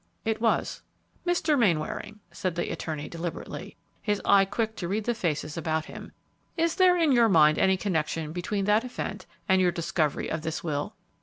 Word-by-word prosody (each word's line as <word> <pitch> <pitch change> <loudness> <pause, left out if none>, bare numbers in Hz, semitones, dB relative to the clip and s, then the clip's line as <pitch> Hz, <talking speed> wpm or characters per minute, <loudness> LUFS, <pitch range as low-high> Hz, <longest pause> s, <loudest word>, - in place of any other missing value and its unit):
"It 220 0 -1
was." 230 -1 +1 0.5
"Mr. 335 -3 +2
Mainwaring," 205 +2 0
said 185 -3 -3
the 175 - -2
attorney, 155 -2 -4
deliberately, 170 0 -6 0.2
his 205 -2 0
eye 195 -1 +6
quick 220 +2 -2
to 175 - -3
read 210 +4 -1
the 240 - 0
faces 155 -7 -2
about 160 -1 -1
him, - - -10 0.5
"is 335 0 +2
there 365 -2 +5
in 325 -4 +3
your 235 -3 +5
mind 155 -4 +5
any 190 0 +4
connection 160 -4 -1
between 190 +4 -2
that 210 +3 +3
event 250 -1 -5 0.2
and 190 -1 +4
your 180 -1 +3
discovery 165 -3 -1
of 155 - -3
this 160 0 -4
will?" 145 -3 -3
190 Hz, 175 wpm, -27 LUFS, 160-220 Hz, 0.5 s, eye